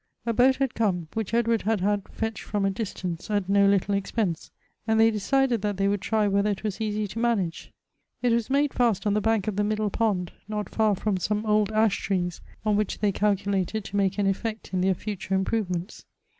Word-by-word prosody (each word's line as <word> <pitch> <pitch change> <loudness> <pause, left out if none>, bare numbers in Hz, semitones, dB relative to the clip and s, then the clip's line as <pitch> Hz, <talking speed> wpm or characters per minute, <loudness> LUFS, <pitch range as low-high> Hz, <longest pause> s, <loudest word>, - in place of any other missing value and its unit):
A 230 - 0
boat 255 +3 +5
had 270 -2 -1
come, 180 -7 0
which 220 -3 -3
Edward 230 -1 +2
had 220 +1 0
had 205 0 0
fetched 225 0 -4
from 205 -2 -1
a 195 - +2
distance, 185 -4 -5
at 205 -3 0
no 200 0 +4
little 200 0 +2
expense; 200 -3 -1 0.4
and 220 0 +3
they 225 0 +6
decided 240 +2 +1
that 205 -1 -1
they 195 0 +2
would 200 -1 0
try 215 0 +1
whether 200 +1 +2
it 200 0 -3
was 215 0 -3
easy 215 -1 -1
to 215 +3 -6
manage. 210 -8 -1 0.5
It 245 - +3
was 230 0 +1
made 280 +1 +2
fast 230 -5 +1
on 205 - +2
the 210 - +1
bank 225 -1 +1
of 205 -2 -2
the 205 - +2
middle 215 0 0
pond, 195 -6 0 0.2
not 210 -2 -3
far 215 -2 +2
from 200 0 -1
some 210 +4 -1
old 210 -1 +2
ash 215 -1 +2
trees, 180 -3 -2 0.2
on 210 -1 +3
which 210 -2 -1
they 205 -1 +1
calculated 200 0 0
to 195 - -8
make 195 -1 +1
an 205 - +1
effect 215 +2 -2
in 185 - +1
their 190 0 +2
future 195 -1 -3
improvements. 190 -2 -2
210 Hz, 215 wpm, -26 LUFS, 195-220 Hz, 0.5 s, they